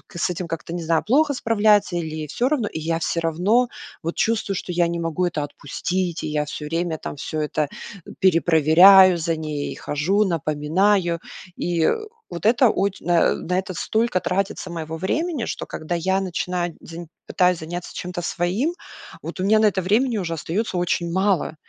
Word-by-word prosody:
с 170 - 0
этим 180 0 -4
как-то, 165 0 -5
не 175 -1 -4
знаю, 160 0 +1
плохо 285 +5 +3
справляется 210 -6 +2
или 170 - -2
ей 155 -1 -5
всё 245 - 0
равно, 265 -8 0
и 160 - -5
я 165 +1 -1
всё 170 0 -1
равно 185 +10 +2 0.3
вот 165 +1 -4
чувствую, 220 -3 0
что 180 - -4
я 175 -1 +2
не 170 0 -3
могу 165 +2 -1
это 155 -4 -2
отпустить, 145 0 -10 0.5
и - - -2
я 150 0 -1
всё 150 0 -6
время 165 +1 -2
там - - -6
всё 155 +2 -4
это 150 0 -1 0.5
перепроверяю, 175 +2 +6
за 165 0 -1
ней 155 -2 -4
хожу, 185 +9 0
напоминаю. 170 +2 +1 0.4
И 170 -2 +1 0.4
вот 170 +3 -7
это 240 +1 +5
оч 195 -1 -1
на 175 -1 +2 0.2
это 185 0 -3
столько 220 -4 0
тратится 185 0 -2
моего 160 -1 -5
времени, 295 - -1
что - - -4
когда 160 +2 -4
я 190 +3 +1
начинаю 180 -2 -2
день, 165 0 -9 0.2
пытаюсь 180 -1 +2
заняться 175 +2 -7
чем-то 180 -1 -5
своим, 185 - -1 0.5
вот - - -7
у - - -1
меня 215 +2 +4
на 215 - +4
это 190 -1 0
времени 225 +5 +1
уже 170 -4 -2
остаётся 180 +5 -2
очень 170 -1 0
мало. 190 -4 +1
175 Hz, 175 wpm, -22 LUFS, 165-200 Hz, 0.5 s, перепроверяю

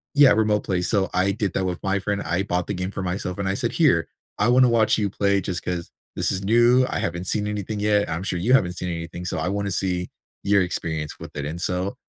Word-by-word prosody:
Yeah, 145 -2 +7
Remote 105 -1 +2
Play. 90 -2 -1
So, 95 +1 +1
I 95 +2 +2
did 100 -2 -2
that 95 - 0
with 90 -1 -2
my 100 0 +1
friend. 100 +1 -2
I 90 +3 -1
bought 90 -2 -1
the 105 - -2
game 90 +1 -3
for 95 - -5
myself, 90 0 -3
and 100 - -1
I 95 - 0
said, - - -1
"Here. - - +3 0.3
I 105 - +2
wanna 125 0 +5
watch 115 -2 +3
you 100 -2 0
play 100 0 +1
just 90 -2 -4
'cause 85 -2 -3 0.3
this - - 0
is 95 +1 -3
new. 120 +4 +4
I - - -2
haven't 85 +1 -3
seen 105 +2 -1
anything 105 0 -3
yet. 105 -2 +2
I'm 80 +3 -3
sure 90 - -2
you 115 +9 +2
haven't 90 -9 +3
seen 90 +1 -4
anything, 85 +1 -5
so 90 - -3
I 80 - -1
wanna 100 0 -2
see 90 -1 -1 0.3
your 100 -1 +4
experience 80 -4 -3
with - - -9
it." 70 -1 -3
And 80 +4 -5
so, 90 +2 -2
95 Hz, 255 wpm, -23 LUFS, 90-105 Hz, 0.3 s, Yeah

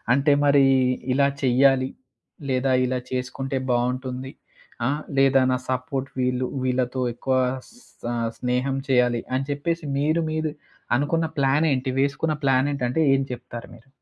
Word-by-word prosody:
అంటే 140 +1 +3
మరి, 140 -1 +5 0.5
ఇలా 140 +2 +3
చెయ్యాలి, 130 +1 +4 0.6
లేదా 130 0 +1
ఇలా 130 0 -1
చేసుకుంటే 130 +2 -3
బావుంటుంది. 125 +2 -1 0.5
ఆ! - - +3 0.3
లేదా 135 0 +5
నా - - +2
సపోర్ట్ 130 +1 -2
వీళ్ళు, 125 0 0 0.2
వీళ్ళతో 130 0 0
ఎక్కువ 130 +2 -1 0.3
స 245 +2 -22 0.3
స్నేహం 125 +2 0
చేయాలి 125 -2 +3
అని 135 +1 -1
చెప్పేసి, 165 +3 -2
మీరు 155 +3 +1
మీరు 155 0 -1 0.5
అనుకున్న 160 +4 +1
ప్లానేంటి 135 -1 +2
వేసుకున్న 145 +3 0
ప్లానేంటి, 135 0 +2
అంటే 145 - 0
ఏం 135 - +2
చెప్తారు 120 -1 -8
మీరు? 115 +3 -19
135 Hz, 130 wpm, -24 LUFS, 125-140 Hz, 0.6 s, మరి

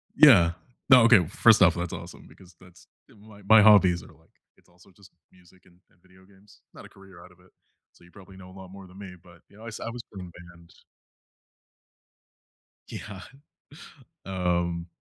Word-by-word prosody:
Yeah, 95 - +5 0.4
no, 125 -3 +6
okay, 115 -7 +4
first 110 +5 +2
off, 90 -3 +4
that's 85 0 -6
awesome - - -12
because 90 -2 -20
that's 90 -1 -21 0.2
my 105 0 -19
my 110 0 +6
hobbies 95 -5 +3
are - - -16
like - - -29 0.3
it's - - -30
also 90 +2 -24
just 100 -3 -21 0.2
music 90 0 -25
and 90 -1 -26
and 90 - -35
video 95 0 -24
games, 100 +1 -24
not - - -15
a - - -16
career 95 -3 -18
out 90 - -18
of 90 - -25
it, 90 +1 -25 0.4
so - - -25
you 85 - -22
probably 95 -1 -17
know 95 -1 -15
a 95 - -17
lot 95 -1 -13
more 95 0 -14
than 90 +1 -19
me, 95 -3 -12
but, 85 -2 -20
you 100 - -22
know, 110 - -16
I - - -10
s 110 - -9
I - - -7
was 120 0 -10
playing 95 -2 -10
in 90 - -14 0.2
band. 85 -1 -22 2.2
Yeah, 100 -3 -10 1.1
um, 85 -2 -3
95 Hz, 195 wpm, -24 LUFS, 90-100 Hz, 2.2 s, no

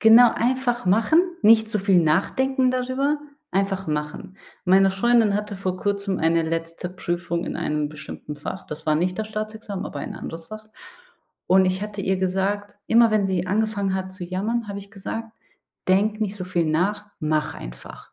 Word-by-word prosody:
genau 225 +2 +8
einfach 245 -1 0
machen, 225 - +4 0.2
nicht 220 0 +6
zu 215 - 0
viel 190 -3 +4
nachdenken 255 - +2
darüber, 260 +4 0 0.3
einfach 195 0 0
machen. 150 +5 -4 0.3
Meine 190 +1 +5
Freundin 225 +1 +3
hatte 210 0 -2
vor 185 -1 -3
Kurzem 200 0 -1
eine 165 +1 +2
letzte 165 +2 -3
Prüfung 175 -1 -3
in - - -4
einem 150 -1 -1
bestimmten 150 0 -8
Fach. 150 +5 -7
Das 150 +1 -7
war 155 -1 +2
nicht 180 +3 0
das 215 +1 -3
Staatsexamen, 215 -2 -5
aber 145 - -6
ein - - -6
anderes 165 0 -7
Fach. 215 +3 -9 0.8
Und 190 0 +5
ich 185 +1 0
hatte 210 -1 -5
ihr 190 0 +1
gesagt 195 +2 -1
immer 230 -1 +5
wenn 210 -2 +3
sie 185 -2 -1
angefangen 205 -1 0
hat 190 0 -3
zu 185 -1 -7
jammern, 210 +6 -2
habe 200 -1 -5
ich 200 0 -15
gesagt: 225 +2 -6 0.6
„Denke 210 +3 +2
nicht 205 -1 -2
so 185 - -5
viel 175 -2 0
nach, 205 +7 0
mach 155 0 0
einfach. - - -10
195 Hz, 175 wpm, -24 LUFS, 180-215 Hz, 0.8 s, genau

